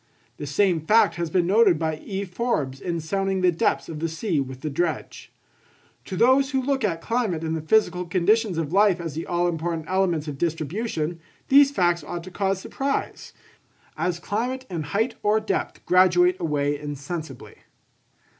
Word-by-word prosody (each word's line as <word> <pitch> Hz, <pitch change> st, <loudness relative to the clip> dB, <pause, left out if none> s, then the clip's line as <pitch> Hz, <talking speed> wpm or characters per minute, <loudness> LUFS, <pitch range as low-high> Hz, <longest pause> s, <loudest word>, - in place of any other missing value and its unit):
The 145 Hz, -, -6 dB
same 175 Hz, +2 st, +2 dB
fact 210 Hz, 0 st, +4 dB
has 170 Hz, -1 st, -2 dB
been 175 Hz, +1 st, +2 dB
noticed 200 Hz, -2 st, +4 dB
by 160 Hz, -1 st, -2 dB
E. 195 Hz, +4 st, -5 dB
Forbes 175 Hz, -, -2 dB
in 170 Hz, -2 st, -2 dB
sounding 195 Hz, +3 st, -1 dB
the 180 Hz, -1 st, +4 dB
depths 165 Hz, -, 0 dB
of 155 Hz, -2 st, -6 dB
the 165 Hz, +1 st, -1 dB
sea 165 Hz, 0 st, -1 dB
with 130 Hz, -1 st, -5 dB
the 155 Hz, -, -3 dB
dredge. 165 Hz, +3 st, -3 dB, 0.7 s
To 190 Hz, -, -5 dB
those 260 Hz, +4 st, +4 dB
who 270 Hz, -2 st, 0 dB
look 270 Hz, -1 st, 0 dB
at 165 Hz, -6 st, -1 dB
climate 220 Hz, -9 st, -1 dB
and 160 Hz, 0 st, -1 dB
the 160 Hz, -, -3 dB
physical 180 Hz, 0 st, +1 dB
conditions 190 Hz, +2 st, +2 dB
of 165 Hz, -1 st, -2 dB
life 200 Hz, -2 st, +4 dB
as 165 Hz, -3 st, -5 dB
the 160 Hz, +3 st, -5 dB
all 175 Hz, 0 st, +1 dB
important 165 Hz, -1 st, -2 dB
elements 180 Hz, -4 st, 0 dB
of 140 Hz, -2 st, -6 dB
distribution, 165 Hz, -, -2 dB, 0.3 s
these 275 Hz, +1 st, +7 dB
facts 175 Hz, -, +1 dB
ought 170 Hz, +3 st, -6 dB
to 185 Hz, -, -10 dB
cause 195 Hz, 0 st, -1 dB
surprise, 275 Hz, +7 st, -3 dB, 0.6 s
as 180 Hz, -1 st, -1 dB
climate 245 Hz, +8 st, -3 dB
and 165 Hz, -4 st, -3 dB
height 220 Hz, -, 0 dB
or 210 Hz, +1 st, +3 dB
depth 215 Hz, -3 st, -3 dB
graduate 180 Hz, 0 st, +4 dB
away 145 Hz, -3 st, -1 dB
insensibly. 145 Hz, -1 st, -7 dB
175 Hz, 175 wpm, -24 LUFS, 160-205 Hz, 0.7 s, these